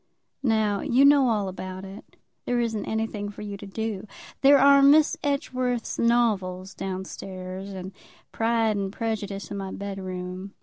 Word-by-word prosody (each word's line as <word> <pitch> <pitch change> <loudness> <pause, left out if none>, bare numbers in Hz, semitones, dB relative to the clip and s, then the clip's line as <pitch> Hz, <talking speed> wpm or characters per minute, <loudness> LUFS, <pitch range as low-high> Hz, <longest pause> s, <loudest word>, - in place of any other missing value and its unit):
"Now 220 -5 +1
you 260 +3 +4
know 280 -3 +6
all 210 -3 0
about 185 0 -6
it. 195 +1 -12 0.3
There 245 -1 0
isn't 225 -3 -1
anything 220 -2 -2
for 205 - -9
you 205 -1 -5
to 200 - -10
do. 215 0 -4 0.3
There 280 +1 +7
are 280 +1 +7
Miss 295 +2 +6
Edgeworth's 255 -5 -1
novels 200 -6 +1
down 190 -1 -4
stairs, 185 0 -7
and 190 -1 -7 0.4
'Pride 225 -1 +1
and 195 -1 -2
Prejudice' 205 -3 -4
in 200 - -3
my 195 -1 -5
bed 200 -1 -5
room. 185 +1 -6
205 Hz, 160 wpm, -26 LUFS, 190-235 Hz, 0.4 s, There